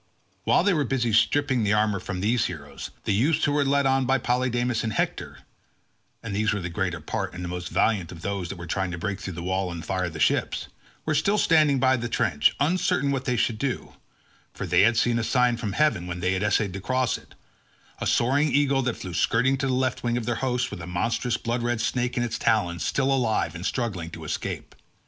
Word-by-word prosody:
While -, -, +4 dB
they 200 Hz, 0 st, +3 dB
were 150 Hz, -4 st, +2 dB
busy 120 Hz, -3 st, 0 dB
stripping 130 Hz, +3 st, +3 dB
the 105 Hz, -1 st, +2 dB
armour 105 Hz, -2 st, +2 dB
from 90 Hz, 0 st, -5 dB
these 115 Hz, +4 st, +2 dB
heroes, 75 Hz, -5 st, -8 dB
the 105 Hz, -, 0 dB
youths 140 Hz, +10 st, +2 dB
who 145 Hz, -, +1 dB
were 145 Hz, 0 st, +2 dB
led 140 Hz, 0 st, +2 dB
on 135 Hz, -1 st, +2 dB
by 135 Hz, +1 st, +3 dB
Polydamas 125 Hz, -1 st, 0 dB
and 110 Hz, -2 st, -2 dB
Hector -, -, -2 dB, 0.8 s
(and 110 Hz, -3 st, -4 dB
these 110 Hz, +1 st, +1 dB
were 105 Hz, -, -1 dB
the 90 Hz, -1 st, -4 dB
greater 90 Hz, -2 st, -2 dB
part 95 Hz, +4 st, -4 dB
and 90 Hz, -, -6 dB
the -, -, -3 dB
most 90 Hz, -2 st, -5 dB
valiant 100 Hz, -7 st, +1 dB
of 85 Hz, -2 st, -10 dB
those 100 Hz, -4 st, -3 dB
that 95 Hz, -, -6 dB
were 85 Hz, -, -7 dB
trying 95 Hz, +2 st, -1 dB
to 90 Hz, -, -5 dB
break 100 Hz, +4 st, -3 dB
through 95 Hz, -2 st, -6 dB
the 85 Hz, -, -6 dB
wall 95 Hz, 0 st, -1 dB
and 85 Hz, -1 st, -6 dB
fire 90 Hz, -2 st, -1 dB
the 80 Hz, -2 st, -8 dB
ships) -, -, +1 dB, 0.4 s
were 155 Hz, -, +1 dB
still 195 Hz, +8 st, +2 dB
standing 155 Hz, -7 st, +4 dB
by 130 Hz, 0 st, +3 dB
the 120 Hz, -1 st, -4 dB
trench, 75 Hz, -10 st, +2 dB
uncertain 145 Hz, -3 st, +1 dB
what 135 Hz, -1 st, -2 dB
they 125 Hz, -, +1 dB
should 110 Hz, -2 st, 0 dB
do; 135 Hz, -1 st, -3 dB, 0.6 s
for -, -, -4 dB
they -, -, +4 dB
had 115 Hz, +3 st, +4 dB
seen 120 Hz, 0 st, +2 dB
a -, -, -1 dB
sign 125 Hz, 0 st, +2 dB
from 110 Hz, -4 st, -4 dB
heaven 145 Hz, -, +1 dB
when 90 Hz, 0 st, -4 dB
they 90 Hz, +1 st, +1 dB
had 95 Hz, -, -1 dB
essayed 105 Hz, -1 st, +1 dB
to 95 Hz, -, -5 dB
cross 130 Hz, +3 st, 0 dB
it—a -, -, -12 dB
soaring 140 Hz, +5 st, +2 dB
eagle 140 Hz, -2 st, +3 dB
that 125 Hz, -2 st, -2 dB
flew 90 Hz, -2 st, -7 dB
skirting 125 Hz, +9 st, +2 dB
the 135 Hz, 0 st, -1 dB
left 130 Hz, 0 st, 0 dB
wing 120 Hz, 0 st, 0 dB
of 120 Hz, -, -3 dB
their 120 Hz, -, 0 dB
host, 125 Hz, -2 st, 0 dB
with -, -, -6 dB
a 80 Hz, -, -7 dB
monstrous 115 Hz, +6 st, -1 dB
blood 120 Hz, +1 st, -2 dB
red 120 Hz, -1 st, 0 dB
snake 125 Hz, +2 st, -1 dB
in 120 Hz, -, +2 dB
its 120 Hz, -, -3 dB
talons 90 Hz, -7 st, +1 dB
still 135 Hz, 0 st, +1 dB
alive 110 Hz, -10 st, +1 dB
and 85 Hz, +3 st, -4 dB
struggling 100 Hz, -10 st, -2 dB
to 85 Hz, -1 st, -9 dB
escape. 75 Hz, -, -4 dB
115 Hz, 230 wpm, -25 LUFS, 95-130 Hz, 0.8 s, While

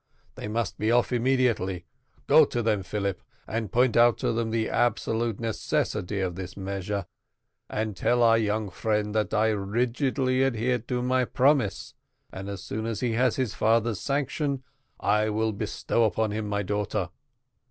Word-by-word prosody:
They -, -, -7 dB
must 110 Hz, -2 st, -2 dB
be 110 Hz, +2 st, +1 dB
off 120 Hz, +1 st, +2 dB
immediately. 120 Hz, -8 st, +1 dB, 0.4 s
Go -, -, +7 dB
to 120 Hz, -, -2 dB
them, 110 Hz, -3 st, +1 dB
Philip, 100 Hz, 0 st, -3 dB, 0.2 s
and 110 Hz, -2 st, -3 dB
point 125 Hz, 0 st, +3 dB
out 120 Hz, 0 st, +5 dB
to -, -, 0 dB
them 115 Hz, 0 st, -1 dB
the 110 Hz, 0 st, 0 dB
absolute 115 Hz, -2 st, 0 dB
necessity 105 Hz, -3 st, -1 dB
of 90 Hz, -2 st, -1 dB
this 90 Hz, +1 st, -7 dB
measure, 100 Hz, 0 st, -3 dB, 0.6 s
and 110 Hz, -2 st, -2 dB
tell 120 Hz, +5 st, +2 dB
our 115 Hz, -1 st, +5 dB
young 105 Hz, -2 st, -1 dB
friend 105 Hz, +2 st, -1 dB
that 110 Hz, -1 st, 0 dB
I 110 Hz, 0 st, +3 dB
rigidly 125 Hz, +5 st, 0 dB
adhere 125 Hz, -1 st, +1 dB
to 125 Hz, +2 st, -3 dB
my 130 Hz, 0 st, +2 dB
promise, 130 Hz, -5 st, +1 dB, 0.4 s
and 95 Hz, +1 st, -6 dB
as 100 Hz, -3 st, -6 dB
soon 110 Hz, +1 st, -4 dB
as 110 Hz, -3 st, -3 dB
he 125 Hz, -, +1 dB
has 125 Hz, +2 st, +2 dB
his 130 Hz, -6 st, -1 dB
father's 115 Hz, 0 st, +2 dB
sanction 140 Hz, -1 st, -1 dB, 0.4 s
I 105 Hz, +1 st, +2 dB
will 110 Hz, +1 st, 0 dB
bestow 110 Hz, +2 st, 0 dB
upon 110 Hz, 0 st, 0 dB
him 105 Hz, 0 st, -3 dB
my 100 Hz, 0 st, -1 dB
daughter. 105 Hz, -1 st, -2 dB
110 Hz, 165 wpm, -27 LUFS, 105-120 Hz, 0.6 s, Go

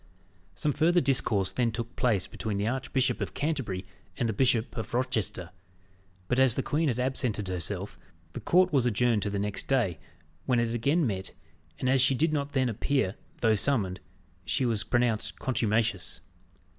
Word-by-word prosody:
Some 150 Hz, -, +1 dB
further 170 Hz, +4 st, +3 dB
discourse 125 Hz, -, +2 dB
then 120 Hz, -2 st, +1 dB
took 115 Hz, +1 st, -5 dB
place 110 Hz, -8 st, +1 dB
between 105 Hz, -2 st, -4 dB
the 100 Hz, +2 st, 0 dB
Archbishop 130 Hz, +1 st, 0 dB
of -, -, -4 dB
Canterbury 135 Hz, -, -2 dB, 0.3 s
and 120 Hz, -, 0 dB
the 110 Hz, -, -1 dB
Bishop 120 Hz, -1 st, +1 dB
of 115 Hz, 0 st, -4 dB
Rochester; 110 Hz, -8 st, -1 dB, 0.8 s
but 125 Hz, +4 st, +1 dB
as 130 Hz, -3 st, +5 dB
the 135 Hz, -, -1 dB
queen 155 Hz, +2 st, 0 dB
had 125 Hz, -3 st, 0 dB
absented 125 Hz, -5 st, -1 dB
herself, 95 Hz, +2 st, -4 dB, 0.3 s
the -, -, -6 dB
court 180 Hz, 0 st, +3 dB
was 130 Hz, -4 st, +3 dB
adjourned 120 Hz, -1 st, +2 dB
to 105 Hz, -, -1 dB
the 100 Hz, -, -2 dB
next 100 Hz, 0 st, -2 dB
day, 110 Hz, -, +1 dB, 0.5 s
when 125 Hz, -2 st, +3 dB
it 115 Hz, -1 st, 0 dB
again 140 Hz, +8 st, +2 dB
met, 95 Hz, -5 st, -3 dB, 0.4 s
and 130 Hz, -, -2 dB
as 130 Hz, 0 st, +4 dB
she 135 Hz, +1 st, +4 dB
did 155 Hz, +4 st, +1 dB
not 145 Hz, -1 st, -2 dB
then 130 Hz, -2 st, +2 dB
appear, 120 Hz, -2 st, 0 dB, 0.3 s
though 110 Hz, -2 st, +4 dB
summoned, 100 Hz, -5 st, 0 dB, 0.4 s
she 130 Hz, -, 0 dB
was 115 Hz, -3 st, +1 dB
pronounced 120 Hz, -3 st, 0 dB
contumacious. 115 Hz, -5 st, 0 dB
120 Hz, 170 wpm, -28 LUFS, 105-135 Hz, 0.8 s, as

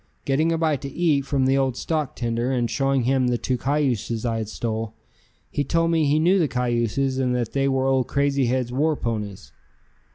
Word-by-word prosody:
Getting 155 Hz, +4 st, +2 dB
a 165 Hz, -, +1 dB
bite 155 Hz, -4 st, 0 dB
to 140 Hz, -, -5 dB
eat 145 Hz, -3 st, +1 dB
from 135 Hz, -2 st, +1 dB
the 135 Hz, +1 st, +3 dB
old 130 Hz, -2 st, 0 dB
stock 155 Hz, -4 st, -2 dB
tender 120 Hz, +1 st, -1 dB
and 120 Hz, -2 st, +1 dB
showing 135 Hz, -1 st, +1 dB
him 130 Hz, +1 st, +2 dB
the 120 Hz, -1 st, +1 dB
two 130 Hz, -, -1 dB
cayuses 125 Hz, -4 st, -1 dB
I 115 Hz, -1 st, 0 dB
had 110 Hz, -2 st, -4 dB
stole, 110 Hz, -1 st, -4 dB, 0.6 s
he 145 Hz, -, 0 dB
told 165 Hz, +3 st, +1 dB
me 160 Hz, -2 st, +2 dB
he 145 Hz, +2 st, +3 dB
knew 180 Hz, +5 st, +3 dB
the 165 Hz, -, +2 dB
cayuses 125 Hz, +1 st, 0 dB
and 125 Hz, -1 st, +1 dB
that 120 Hz, -3 st, -2 dB
they 135 Hz, 0 st, +1 dB
were 135 Hz, -1 st, +1 dB
old 135 Hz, -1 st, +2 dB
Crazy 140 Hz, -2 st, +1 dB
Head's 125 Hz, 0 st, -1 dB
war 150 Hz, +5 st, +1 dB
ponies. 105 Hz, -6 st, -4 dB
135 Hz, 205 wpm, -23 LUFS, 120-145 Hz, 0.6 s, the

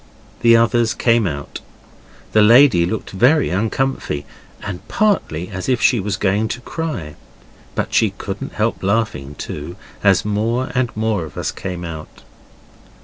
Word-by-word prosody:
The 115 Hz, -1 st, +6 dB
others 115 Hz, 0 st, +2 dB
came 115 Hz, -3 st, +2 dB
out. 70 Hz, -3 st, -5 dB, 0.7 s
The 110 Hz, -, +4 dB
lady 115 Hz, -5 st, +6 dB
looked 110 Hz, +3 st, -4 dB
very 130 Hz, -, +3 dB
uncomfy, 110 Hz, -, -1 dB, 0.4 s
and 95 Hz, -3 st, -5 dB
partly 200 Hz, -, 0 dB
as 95 Hz, +3 st, -5 dB
if 125 Hz, -3 st, +2 dB
she 120 Hz, +1 st, +3 dB
was 100 Hz, -1 st, -2 dB
going 105 Hz, +2 st, +1 dB
to 120 Hz, +2 st, -5 dB
cry. 135 Hz, -, -4 dB, 0.6 s
But -, -, -2 dB
she -, -, +4 dB
couldn't -, -, -6 dB
help -, -, -1 dB
laughing 95 Hz, -9 st, -1 dB
too, 75 Hz, +5 st, -6 dB, 0.3 s
as 95 Hz, -1 st, +4 dB
more 115 Hz, +5 st, -1 dB
and 125 Hz, -2 st, +1 dB
more 110 Hz, -4 st, 0 dB
of 80 Hz, -, -10 dB
us -, -, -2 dB
came 90 Hz, -2 st, -6 dB
out. 80 Hz, -2 st, -9 dB
105 Hz, 145 wpm, -19 LUFS, 90-120 Hz, 0.7 s, The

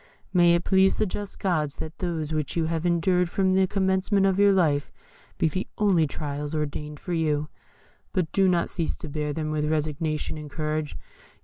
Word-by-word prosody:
May 175 Hz, -1 st, +5 dB
it 170 Hz, -, 0 dB
please 190 Hz, 0 st, +4 dB
the -, -, +1 dB
just 205 Hz, +1 st, -5 dB
gods 155 Hz, -7 st, 0 dB
that 160 Hz, +1 st, -7 dB
those 160 Hz, -4 st, -2 dB
which 155 Hz, -2 st, -2 dB
you 165 Hz, -, +2 dB
have 165 Hz, +1 st, -1 dB
endured 175 Hz, +1 st, +2 dB
from 190 Hz, +1 st, +1 dB
the 190 Hz, 0 st, +3 dB
commencement 190 Hz, +1 st, +1 dB
of 195 Hz, 0 st, +2 dB
your 205 Hz, 0 st, +6 dB
life 155 Hz, -7 st, +2 dB, 0.5 s
be -, -, +2 dB
the 185 Hz, +5 st, -2 dB
only 185 Hz, -7 st, +3 dB
trials 145 Hz, +1 st, -4 dB
ordained 150 Hz, 0 st, -4 dB
for 180 Hz, -, -5 dB
you. 155 Hz, -2 st, 0 dB, 0.6 s
But 180 Hz, -5 st, -1 dB
do 195 Hz, -1 st, +3 dB
not 175 Hz, -2 st, +1 dB
cease 165 Hz, -3 st, -2 dB
to -, -, -8 dB
bear 150 Hz, 0 st, -2 dB
them 155 Hz, +1 st, -3 dB
with 150 Hz, -1 st, 0 dB
resignation 155 Hz, 0 st, -1 dB
and 150 Hz, -1 st, -8 dB
courage. 155 Hz, 0 st, -3 dB
165 Hz, 190 wpm, -26 LUFS, 150-185 Hz, 0.6 s, your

